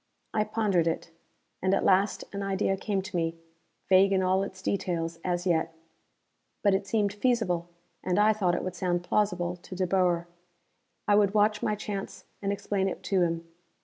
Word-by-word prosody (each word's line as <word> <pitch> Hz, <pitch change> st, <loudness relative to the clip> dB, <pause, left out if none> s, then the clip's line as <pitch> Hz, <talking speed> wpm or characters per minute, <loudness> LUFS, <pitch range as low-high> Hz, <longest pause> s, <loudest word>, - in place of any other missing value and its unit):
I 215 Hz, -1 st, +2 dB
pondered 210 Hz, -6 st, +1 dB
it. 165 Hz, 0 st, -2 dB, 0.5 s
And 190 Hz, +1 st, +3 dB
at -, -, 0 dB
last 195 Hz, +1 st, +3 dB
an 200 Hz, -, -3 dB
idea 195 Hz, 0 st, 0 dB
came 195 Hz, 0 st, -2 dB
to 190 Hz, 0 st, -8 dB
me, 165 Hz, -1 st, -1 dB, 0.5 s
vague 195 Hz, +1 st, +5 dB
in 190 Hz, -1 st, +2 dB
all 185 Hz, +1 st, +2 dB
its 190 Hz, -1 st, -6 dB
details, 170 Hz, -4 st, -2 dB
as 175 Hz, 0 st, -1 dB
yet. 165 Hz, -2 st, +1 dB, 0.9 s
But 200 Hz, -2 st, +4 dB
it 195 Hz, +1 st, 0 dB
seemed 205 Hz, -1 st, +1 dB
feasible, 205 Hz, -7 st, 0 dB, 0.3 s
and 180 Hz, -, 0 dB
I 210 Hz, +1 st, +5 dB
thought 185 Hz, -5 st, +1 dB
it -, -, -2 dB
would 185 Hz, -, -3 dB
sound 175 Hz, -1 st, -1 dB
plausible 180 Hz, -3 st, 0 dB
to 180 Hz, +1 st, -10 dB
De 185 Hz, 0 st, 0 dB
Boer. 175 Hz, -2 st, +1 dB, 0.8 s
I 205 Hz, -, +4 dB
would 205 Hz, 0 st, +4 dB
watch 210 Hz, 0 st, +3 dB
my 210 Hz, -, 0 dB
chance 205 Hz, -1 st, -6 dB, 0.2 s
and 200 Hz, 0 st, -1 dB
explain 200 Hz, -1 st, -1 dB
it -, -, -7 dB
to 190 Hz, -2 st, +1 dB
him. 165 Hz, -1 st, 0 dB
190 Hz, 180 wpm, -28 LUFS, 175-205 Hz, 0.9 s, vague